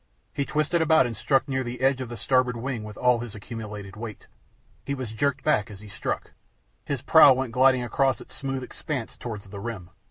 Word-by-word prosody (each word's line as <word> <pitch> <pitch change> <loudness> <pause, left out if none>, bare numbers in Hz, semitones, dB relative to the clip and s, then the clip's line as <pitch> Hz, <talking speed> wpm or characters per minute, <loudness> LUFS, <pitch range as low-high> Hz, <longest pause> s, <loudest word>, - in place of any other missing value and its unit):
He 140 - -1
twisted 155 +4 +1
about 160 -3 +5
and 120 -2 -3
struck 135 +5 +1
near 130 -1 -1
the 120 0 -6
edge 135 0 +3
of 125 - -5
the 120 - -6
starboard 125 +2 +2
wing 120 -2 -3
with 105 -1 -9
all 125 -1 +3
his 115 -3 -7
accumulated 105 -3 -7
weight. 110 -1 -8 0.6
He 140 - -2
was 130 -5 -5
jerked 140 +4 0
back 120 -7 +2
as 100 -3 -10
he 105 0 -12
struck. - - -4 0.5
His - - -3
prow 140 - +8
went 130 -2 -2
gliding 130 0 +4
across 130 0 +1
its - - -13
smooth 135 -1 -3
expanse 130 -1 -5
towards 110 -4 -7
the 100 +1 -9
rim. 100 -5 -6
125 Hz, 210 wpm, -26 LUFS, 110-135 Hz, 0.6 s, prow